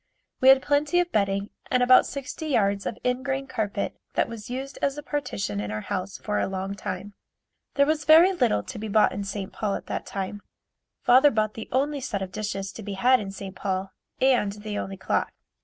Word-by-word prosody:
We 260 Hz, -, +6 dB
had 265 Hz, 0 st, +7 dB
plenty 295 Hz, +4 st, +2 dB
of 350 Hz, 0 st, 0 dB
bedding 200 Hz, -1 st, 0 dB, 0.2 s
and 250 Hz, -1 st, +3 dB
about 255 Hz, +1 st, +6 dB
sixty 280 Hz, +3 st, -6 dB
yards 200 Hz, -7 st, +1 dB
of -, -, -4 dB
ingrain 265 Hz, +2 st, -1 dB
carpet 220 Hz, -6 st, -3 dB, 0.2 s
that -, -, +2 dB
was 230 Hz, -2 st, -8 dB
used 265 Hz, +2 st, -5 dB
as 280 Hz, 0 st, 0 dB
a 295 Hz, -, -6 dB
partition 200 Hz, -, -3 dB
in 105 Hz, 0 st, -3 dB
our 105 Hz, 0 st, -3 dB
house 195 Hz, -, -4 dB
for 210 Hz, -1 st, -2 dB
a -, -, 0 dB
long 190 Hz, 0 st, -3 dB
time. 195 Hz, +1 st, -6 dB, 0.6 s
There 280 Hz, -, +5 dB
was 310 Hz, +1 st, 0 dB
very 335 Hz, +5 st, +7 dB
little 245 Hz, -, +1 dB
to -, -, -7 dB
be 220 Hz, -, -4 dB
bought 215 Hz, +1 st, +4 dB
in 200 Hz, -, -4 dB
St. 200 Hz, 0 st, -5 dB
Paul 205 Hz, -2 st, -1 dB
at -, -, -6 dB
that -, -, -4 dB
time. 195 Hz, +1 st, -4 dB, 0.6 s
Father 260 Hz, +4 st, +7 dB
bought 215 Hz, -3 st, 0 dB
the 225 Hz, -, -8 dB
only 280 Hz, +2 st, 0 dB
set 200 Hz, -6 st, -3 dB
of 185 Hz, -, -7 dB
dishes 195 Hz, -2 st, -4 dB
to -, -, -9 dB
be 205 Hz, -1 st, -5 dB
had 250 Hz, +6 st, +4 dB
in 200 Hz, -, -5 dB
St. 195 Hz, -1 st, -8 dB
Paul 190 Hz, 0 st, -2 dB, 0.3 s
and 245 Hz, -6 st, +3 dB
the 210 Hz, 0 st, -6 dB
only 195 Hz, -1 st, -4 dB
clock. 190 Hz, -, -1 dB
215 Hz, 210 wpm, -26 LUFS, 195-265 Hz, 0.6 s, had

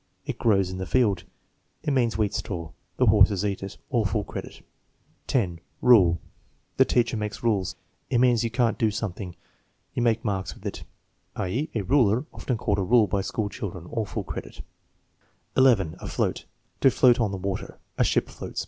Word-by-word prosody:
"It -, -, -4 dB
grows 95 Hz, -5 st, +2 dB
in 95 Hz, -, -6 dB
the 95 Hz, -, -4 dB
field," 115 Hz, -6 st, +2 dB, 0.6 s
"It 150 Hz, -, 0 dB
means 120 Hz, -6 st, +1 dB
wheat 105 Hz, -2 st, 0 dB
straw." 85 Hz, -5 st, -4 dB, 0.3 s
"The 130 Hz, -, +4 dB
horses 105 Hz, -2 st, +5 dB
eat 100 Hz, -2 st, -2 dB
it." 95 Hz, 0 st, -7 dB
(All 120 Hz, -4 st, +2 dB
full 100 Hz, +1 st, 0 dB
credit.) -, -, -8 dB, 0.6 s
10. 90 Hz, -10 st, 0 dB, 0.2 s
Rule. 95 Hz, -9 st, +6 dB, 0.6 s
"The -, -, +6 dB
teacher 120 Hz, -2 st, +1 dB
makes 105 Hz, 0 st, -4 dB
rules." 100 Hz, -6 st, +1 dB, 0.3 s
"It 125 Hz, -, +2 dB
means 120 Hz, -2 st, +4 dB
you 115 Hz, -, 0 dB
can't 115 Hz, 0 st, +1 dB
do 110 Hz, -, +3 dB
something." 100 Hz, -4 st, -4 dB, 0.6 s
"You -, -, -1 dB
make 115 Hz, 0 st, +1 dB
marks 95 Hz, -5 st, -2 dB
with -, -, -17 dB
it," -, -, -5 dB, 0.5 s
i.e., 120 Hz, -, -2 dB
a 110 Hz, -, +1 dB
ruler, 120 Hz, +2 st, +3 dB
often 125 Hz, -, -2 dB
called 100 Hz, -2 st, 0 dB
a -, -, +1 dB
rule 115 Hz, +3 st, +5 dB
by 100 Hz, 0 st, -1 dB
school 105 Hz, +2 st, -2 dB
children. 95 Hz, -7 st, -6 dB
(All 115 Hz, -2 st, -1 dB
full 105 Hz, 0 st, -4 dB
credit.) 80 Hz, -, -7 dB, 0.9 s
11. 115 Hz, -11 st, +4 dB
Afloat. -, -, -2 dB, 0.3 s
"To 135 Hz, -, +6 dB
float 125 Hz, -1 st, +4 dB
on 110 Hz, -3 st, +2 dB
the 95 Hz, -, -4 dB
water." 95 Hz, 0 st, -4 dB, 0.2 s
"A -, -, +6 dB
ship -, -, +1 dB
floats." -, -, -7 dB
105 Hz, 180 wpm, -26 LUFS, 95-120 Hz, 0.9 s, Rule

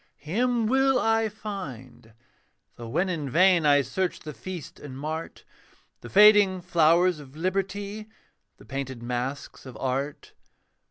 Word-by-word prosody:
Him 235 Hz, +8 st, 0 dB
will 265 Hz, +3 st, +3 dB
I 225 Hz, 0 st, +2 dB
find: 135 Hz, -, -8 dB, 0.6 s
though 120 Hz, -, -9 dB
when 170 Hz, +10 st, 0 dB
in 160 Hz, -6 st, -3 dB
vain 175 Hz, +1 st, +4 dB
I 145 Hz, -1 st, +5 dB
search 185 Hz, +5 st, -3 dB
the 150 Hz, -, -8 dB
feast 165 Hz, +7 st, -8 dB
and 135 Hz, -3 st, -9 dB
mart, 155 Hz, +3 st, -6 dB, 0.5 s
The -, -, -11 dB
fading 205 Hz, -2 st, +6 dB
flowers 170 Hz, +1 st, +3 dB
of 140 Hz, -1 st, -13 dB
liberty, 200 Hz, +4 st, -3 dB, 0.5 s
The -, -, -17 dB
painted 130 Hz, -3 st, -5 dB
masks 125 Hz, +3 st, -4 dB
of 130 Hz, -, -10 dB
art. 135 Hz, +2 st, -3 dB
170 Hz, 130 wpm, -26 LUFS, 140-200 Hz, 0.6 s, fading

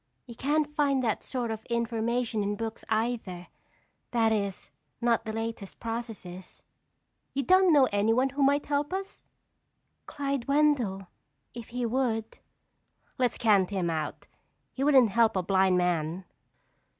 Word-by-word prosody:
"You 240 Hz, -, -10 dB
can't 295 Hz, +4 st, 0 dB
find 280 Hz, -3 st, +2 dB
that 220 Hz, -3 st, 0 dB
sort 245 Hz, -3 st, -3 dB
of 220 Hz, 0 st, -5 dB
information 235 Hz, -1 st, -1 dB
in 205 Hz, 0 st, -1 dB
books 225 Hz, +1 st, -5 dB
either—that 225 Hz, +1 st, -3 dB
is, 200 Hz, -3 st, -2 dB, 0.3 s
not 235 Hz, -1 st, +1 dB
the 220 Hz, -, -3 dB
latest 225 Hz, -2 st, -5 dB
processes." 225 Hz, -6 st, -7 dB, 0.7 s
"You 275 Hz, -, 0 dB
don't 370 Hz, +1 st, +5 dB
know 280 Hz, -4 st, +6 dB
anyone 225 Hz, +6 st, +2 dB
who 275 Hz, +2 st, -4 dB
might 280 Hz, +1 st, +3 dB
help 290 Hz, +2 st, -1 dB
us?" 390 Hz, +1 st, -5 dB, 0.9 s
"Clyde 280 Hz, -3 st, -3 dB
Wendell, 275 Hz, -10 st, +2 dB, 0.5 s
if 235 Hz, -1 st, -8 dB
he 245 Hz, 0 st, -3 dB
would." 230 Hz, -2 st, -1 dB, 0.8 s
"Let's 250 Hz, -2 st, +1 dB
count 205 Hz, -5 st, +3 dB
him 185 Hz, -4 st, -1 dB
out. 155 Hz, -2 st, -4 dB, 0.5 s
He 270 Hz, -, -3 dB
wouldn't 265 Hz, -7 st, +5 dB
help 225 Hz, 0 st, +3 dB
a 185 Hz, -, 0 dB
blind 190 Hz, 0 st, +3 dB
man." 175 Hz, 0 st, -1 dB
230 Hz, 135 wpm, -28 LUFS, 205-270 Hz, 0.9 s, know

